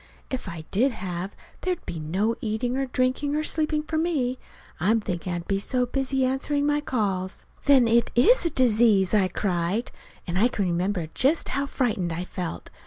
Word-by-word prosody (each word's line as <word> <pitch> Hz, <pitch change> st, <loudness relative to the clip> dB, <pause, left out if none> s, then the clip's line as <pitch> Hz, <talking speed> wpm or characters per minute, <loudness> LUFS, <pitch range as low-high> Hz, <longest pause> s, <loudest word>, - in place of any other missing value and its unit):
If 255 Hz, -7 st, -3 dB
I 165 Hz, -2 st, -7 dB
did 245 Hz, +6 st, +2 dB
have, 185 Hz, -1 st, -5 dB, 0.3 s
there'd 365 Hz, -2 st, -2 dB
be 170 Hz, -, -5 dB
no 190 Hz, +9 st, 0 dB
eating 235 Hz, +3 st, -1 dB
or 270 Hz, 0 st, -1 dB
drinking 255 Hz, +3 st, 0 dB
or 305 Hz, -, 0 dB
sleeping 305 Hz, -1 st, 0 dB
for 315 Hz, +1 st, -2 dB
me, 275 Hz, -7 st, 0 dB, 0.4 s
I'm 215 Hz, +7 st, +3 dB
thinking 180 Hz, -3 st, -4 dB
I'd 175 Hz, 0 st, -4 dB
be 195 Hz, 0 st, +1 dB
so 250 Hz, +4 st, 0 dB
busy 265 Hz, +1 st, 0 dB
answering 285 Hz, +2 st, 0 dB
my 295 Hz, 0 st, +2 dB
calls." 195 Hz, -9 st, -2 dB, 0.2 s
"Then 270 Hz, -4 st, +6 dB
it 235 Hz, +1 st, +3 dB
is 455 Hz, -, +5 dB
a 335 Hz, -, +2 dB
disease!" 220 Hz, -, +4 dB
I 200 Hz, -3 st, +4 dB
cried. 185 Hz, +4 st, -1 dB, 0.3 s
And 175 Hz, +1 st, -1 dB
I 230 Hz, -, +5 dB
can 205 Hz, -5 st, -1 dB
remember 175 Hz, -1 st, -1 dB
just 285 Hz, +6 st, +2 dB
how 280 Hz, 0 st, -1 dB
frightened 220 Hz, -11 st, -1 dB
I 165 Hz, +2 st, -3 dB
felt. 180 Hz, -, -6 dB
230 Hz, 180 wpm, -25 LUFS, 185-270 Hz, 0.4 s, Then